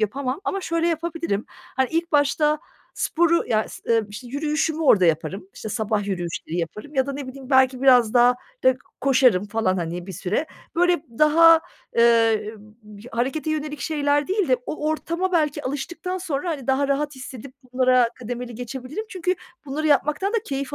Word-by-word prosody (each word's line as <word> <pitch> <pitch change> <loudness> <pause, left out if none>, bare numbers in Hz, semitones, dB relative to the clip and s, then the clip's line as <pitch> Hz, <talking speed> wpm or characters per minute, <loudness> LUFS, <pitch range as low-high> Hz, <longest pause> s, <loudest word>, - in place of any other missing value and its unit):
yapamam 255 - -2
ama 390 - -1
şöyle 335 -1 0
yapabilirim. 330 -9 -2
Hani, 260 0 -3
ilk 335 0 -1
başta 295 +1 +3 0.4
sporu 335 0 +2
ya, 215 -2 +2
ıs - - -11
eee, 230 -1 +3
işte, 210 +5 -9
yürüyüşümü 305 +3 -1
orada 190 - +5
yaparım, 180 +4 -1
işte, 220 - -7
sabah 215 -2 -1
yürüyüşleri 175 -3 -4
yaparım 210 - -5
ya 265 0 +2
da 280 - -3
ne 275 -1 -6
bileyim 265 0 -10
belki 260 -1 +4
biraz 250 -4 +5
daha 245 0 +6 0.3
rık 260 0 +3 0.2
koşarım 250 -8 +4
falan, 205 -3 0
hani, 175 +1 -4
bir 190 - -7
süre. 205 - -2 0.3
Böyle, 350 -2 +3 0.2
daha, 325 +2 +7 0.4
eee, 225 -2 +3 0.3
b 210 -1 -13
harekete 265 +7 -1
yönelik 300 -1 -3
şeyler 290 -2 0
değil 390 -3 0
de 255 - +4
o 305 0 -4
ortama 335 +4 -2
belki 300 -3 +1
alıştıktan 340 +7 -4
sonra, 340 -1 -3
hani, 280 -6 -5
daha 270 +1 +1
rahat 290 +1 0
hissedip 260 0 -9 0.2
bunlara 255 -2 +4
kademeli 245 0 -6
geçebilirim 255 - -6
çünkü 370 -2 -1 0.3
bunları 300 +3 -2
yapmaktan 300 - +2
da - - +2
keyif 275 +1 -4
270 Hz, 170 wpm, -23 LUFS, 235-310 Hz, 0.4 s, daha